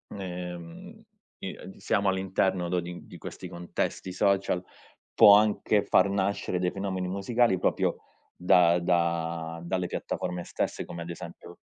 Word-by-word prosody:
ehm, 90 -3 -7 0.4
i - - -6
ad 95 - -11
siamo 100 -2 0
all'interno, 95 -1 0
no, 90 0 +1
di 90 0 -7
di - - -11
questi - - -8
contesti 90 +1 -4
social, 95 -2 +1 0.5
può 100 -1 +9
anche 105 0 +3
far 95 +1 +4
nascere 100 -1 -1
dei 90 0 0
fenomeni 95 -2 -3
musicali 100 +2 +1
proprio - - +1 0.4
da 90 -1 +4
da 85 -1 -1
dalle 90 +1 -1
piattaforme 90 0 -3
stesse - - -3
come 85 0 -7
ad 85 - -9
esempio 85 - -10
90 Hz, 140 wpm, -28 LUFS, 85-95 Hz, 0.5 s, può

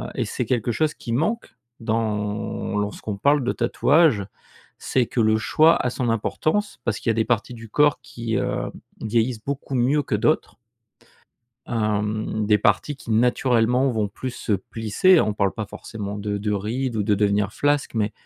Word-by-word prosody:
et - - 0
c'est - - -3
quelque 120 -2 0
chose 155 +5 0
qui 115 - -7
manque 165 - -1 0.3
dans 110 -2 -2
lorsqu'on 105 0 -3
parle 140 +4 +3
de 125 - 0
tatouage, 125 - +3 0.5
c'est 125 -3 0
que - - -3
le 110 -1 +4
choix 155 +8 +4
a - - +2
son 125 0 -2
importance. 155 - -1
Parce 110 -2 -1
qu'il - - -2
y - - +5
a - - +1
des 110 0 +1
parties 115 +1 0
du 115 -1 -10
corps 145 +5 +3
qui, 115 -2 -4
heu, - - -2 0.3
vieillissent 115 +1 0
beaucoup 140 -1 -4
mieux 135 +4 +2
que 110 - -1
d'autres. 150 +9 0 1.1
Hem, 110 -1 -1
des 105 0 +4
parties 145 +7 +1
qui, 125 - -10
naturellement, 125 +2 +3
vont 110 -4 -1
plus 130 +6 -5
se 115 - -3
plisser. 115 - +3
On 105 - 0
parle 100 -2 +1
pas 110 - -5
forcément 100 0 -7
de 105 0 -2
de 105 +1 -1
rides 115 +5 -2
ou 105 - +1
de 105 0 +2
devenir 100 0 +1
flasque, 145 -2 0
mais 110 -1 0
115 Hz, 180 wpm, -23 LUFS, 105-130 Hz, 1.1 s, y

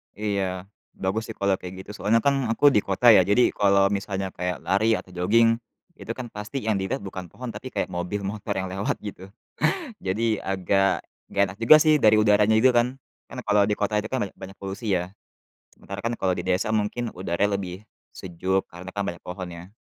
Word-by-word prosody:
Iya, 100 -2 -2 0.2
bagus, 95 +4 -2
sih, 115 - -7
kalau 100 -2 0
kayak 90 0 -8
gitu, 100 - -16
soalnya, 115 +3 +2
kan, 140 -2 +1
aku 115 +6 +4
di 105 -7 +2
kota, 100 +5 +4
ya, 95 -5 +7
jadi 105 +6 +4
kalau 100 -1 +3
misalnya 100 -1 -2
kayak 90 0 -4
lari 110 +4 +2
atau 95 - -3
joging, 115 +6 +3 0.4
itu, - - -6
kan, 125 -2 -7
pasti 105 +6 -5
yang 110 -3 0
dilihat 95 +8 -2
bukan 95 -2 -7
pohon 125 -1 -7
tapi 115 +4 -8
kayak - - -1
mobil, 90 +3 -3
motor 100 +1 -3
yang 95 -1 -3
lewat, 95 +2 -2
gitu. 95 -1 -9 0.7
Jadi 110 +4 +1
agak 95 0 +1 0.3
nggak 100 - +3
enak 95 - -12
juga, 155 +6 +9
sih, 155 -1 +5
dari 110 -5 +5
udaranya 105 +1 +4
itu, 130 - +6
kan. 125 +3 +1 0.2
Kan, - - -8
kalau 105 -1 +3
di 105 - 0
kota 105 +1 -1
itu, 105 - 0
kan, 130 - 0
banyak - - -23
banyak 95 +1 -10
polusi, 100 +2 -3
ya, 90 0 0 0.7
sementara, 100 0 -8
kan, 115 +2 -2
kalau 95 -3 0
di 90 - -3
desa 95 +4 0
mungkin 110 +2 -1
udaranya 95 +3 -1
lebih 95 +2 -7 0.3
sejuk 95 +2 -1
karena, 90 +2 -9
kan, 100 - 0
banyak 85 -3 -5
pohon, 90 0 -7
ya. 90 +5 -11
100 Hz, 200 wpm, -25 LUFS, 95-110 Hz, 0.7 s, juga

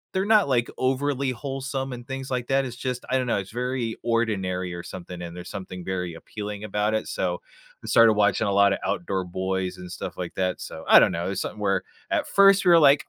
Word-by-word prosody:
they’re 190 +2 +1
not, 200 - +1
like, 120 0 +1
overly 135 0 0
wholesome, 135 +1 -4
and 120 -1 -8
things 135 0 -5
like 125 -1 -2
that. 135 0 +2
It’s 125 -1 -7
just 125 -1 -2
I 130 - +3
don’t 130 -1 -1
know, 110 - +2
it’s 110 +6 -7
very 125 -2 -1 0.3
ordinary 95 -6 -1
or 85 - -7
something, 90 0 -8
and 85 -1 -6
there’s 90 0 -8
something 90 -1 -7
very 90 -2 -3
appealing 105 -1 -6
about 105 +2 0
it, - - -11
so - - +1 0.6
I - - -8
started 115 -1 +6
watching 105 0 +2
a 100 0 +1
lotta 100 -1 +4
Outdoor 95 +1 -2 0.2
Boys 95 -1 -1
and 90 -1 -9
stuff - - -6
like - - -6
that, 90 -1 0
so, - - -9
I - - +9
don’t - - +3
know, 85 - -2
it’s 95 - -2
something 105 - -6
where 100 - +2 0.4
at - - -2
first, 195 0 +7
we 180 - +5
were 165 -2 +7
like, 145 +1 +1
110 Hz, 230 wpm, -25 LUFS, 95-130 Hz, 0.6 s, I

